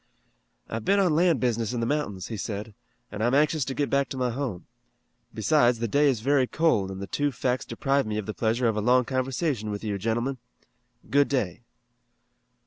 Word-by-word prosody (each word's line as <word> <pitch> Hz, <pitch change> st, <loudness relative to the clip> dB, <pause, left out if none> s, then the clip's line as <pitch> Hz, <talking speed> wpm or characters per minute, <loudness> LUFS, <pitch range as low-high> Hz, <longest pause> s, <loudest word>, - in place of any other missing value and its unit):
"I've 115 Hz, 0 st, -4 dB
been 200 Hz, -, +3 dB
on 180 Hz, -5 st, +3 dB
land 170 Hz, -4 st, +3 dB
business 115 Hz, -1 st, 0 dB
in 120 Hz, -, -2 dB
the 115 Hz, -, 0 dB
mountains," 110 Hz, -, -2 dB
he 115 Hz, -, -4 dB
said, 105 Hz, +1 st, -5 dB, 0.4 s
"and 105 Hz, +1 st, -3 dB
I'm 120 Hz, +3 st, +2 dB
anxious 150 Hz, +1 st, +3 dB
to 135 Hz, -, -4 dB
get 145 Hz, -, 0 dB
back 140 Hz, -1 st, +2 dB
to 135 Hz, -, -5 dB
my 125 Hz, -1 st, 0 dB
home. 120 Hz, -8 st, -4 dB, 0.7 s
Besides 120 Hz, +1 st, +3 dB
the 115 Hz, +1 st, -2 dB
day 145 Hz, +6 st, +3 dB
is 120 Hz, -5 st, -1 dB
very 135 Hz, +1 st, +2 dB
cold, 140 Hz, -13 st, +1 dB
and 95 Hz, 0 st, -6 dB
the 100 Hz, -, -4 dB
two 145 Hz, +10 st, -1 dB
facts 125 Hz, +1 st, -1 dB
deprive 140 Hz, -3 st, 0 dB
me 105 Hz, 0 st, -2 dB
of 110 Hz, -, -3 dB
the 110 Hz, -, -4 dB
pleasure 115 Hz, +3 st, +1 dB
of 110 Hz, -, +1 dB
a 105 Hz, -, -1 dB
long 125 Hz, +3 st, +4 dB
conversation 130 Hz, -, -1 dB
with 105 Hz, 0 st, -5 dB
you, 105 Hz, -2 st, -2 dB
gentlemen. 120 Hz, +5 st, -1 dB, 0.7 s
Good 140 Hz, +1 st, +4 dB
day." 110 Hz, -9 st, -1 dB
125 Hz, 205 wpm, -26 LUFS, 110-140 Hz, 0.7 s, long